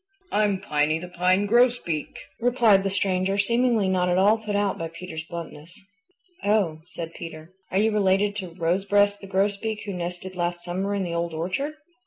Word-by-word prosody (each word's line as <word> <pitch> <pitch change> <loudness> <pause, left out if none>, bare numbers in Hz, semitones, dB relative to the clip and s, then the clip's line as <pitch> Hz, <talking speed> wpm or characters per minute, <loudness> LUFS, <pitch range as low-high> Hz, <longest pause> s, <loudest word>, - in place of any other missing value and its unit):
"I'm 205 -2 +2
Piny 150 -3 +1
the 175 +2 -7
Pine 185 +3 +2
Grosbeak," 235 -8 +2 0.2
replied 235 -4 +4
the 195 - 0
stranger, 195 0 0
seemingly 235 0 +2
not 180 -1 +1
at 180 - +2
all 205 +4 +4
put 215 -2 -3
out 205 -1 0
by 165 - -2
Peter's 165 -1 -7
bluntness. 170 -1 -8 0.6
"Oh," 200 -7 +2
said 170 -2 -7
Peter. 165 +1 -9 0.2
"Are 190 - +1
you 220 +2 +3
related 200 0 +2
to 180 -4 -6
Rosebreast 200 +4 +2
the 195 - -9
Grosbeak 205 +3 -1
who 200 - -4
nested 180 +1 -5
last 175 0 -2
summer 190 +3 -2
in 200 - -1
the 170 -2 -3
Old 170 -1 -2
Orchard?" 185 - -2
190 Hz, 175 wpm, -25 LUFS, 175-205 Hz, 0.6 s, replied